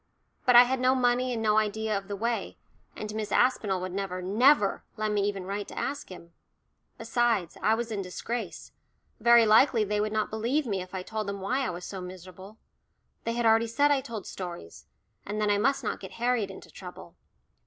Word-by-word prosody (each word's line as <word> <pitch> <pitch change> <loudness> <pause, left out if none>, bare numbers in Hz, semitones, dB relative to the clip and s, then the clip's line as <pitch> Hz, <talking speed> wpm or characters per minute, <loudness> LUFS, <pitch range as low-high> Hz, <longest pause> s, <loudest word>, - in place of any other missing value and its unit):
But 250 - +6
I 240 - +11
had 260 +1 -1
no 255 +1 +3
money 250 0 +2
and 225 -2 -2
no 215 0 +4
idea 215 0 -1
of 195 0 -4
the 200 - -4
way, 230 +3 -2 0.4
and 210 0 -6
Miss 215 -1 -4
Aspinall 210 -7 +2
would 185 0 -4
never, 190 -1 -3
never 210 +4 +3
let 215 0 -1
me 205 -1 +1
even 195 -2 -3
write 200 +2 -4
to - - -11
ask 285 +1 -3
him. 170 -2 -12 0.6
Besides, 225 -6 0
I 220 - +3
was 235 0 -4
in 205 -2 -2
disgrace, 210 +6 -5 0.5
very 235 +1 +6
likely 225 +1 +5
they 210 0 -1
would 215 0 -1
not 215 0 -1
believe 240 +7 0
me 200 -5 -2
if 185 +1 -9
I 185 - -4
told 215 +1 -4
them 200 0 -4
why 225 +8 -1
I 270 - -1
was 175 0 -6
so 190 -2 -6
miserable; 185 +3 -10 0.7
they 230 - -1
had 240 0 -1
already 225 +1 +4
said 285 +6 +2
I 280 -2 +3
told 225 -6 -7
stories, 170 - -8 0.4
and 210 +2 -4
then 210 -1 +2
I 205 - +2
must 275 +5 +1
not - - -2
get 190 - -10
Harriet 240 -3 0
into 190 - -11
trouble. - - -11
215 Hz, 205 wpm, -28 LUFS, 195-240 Hz, 0.7 s, I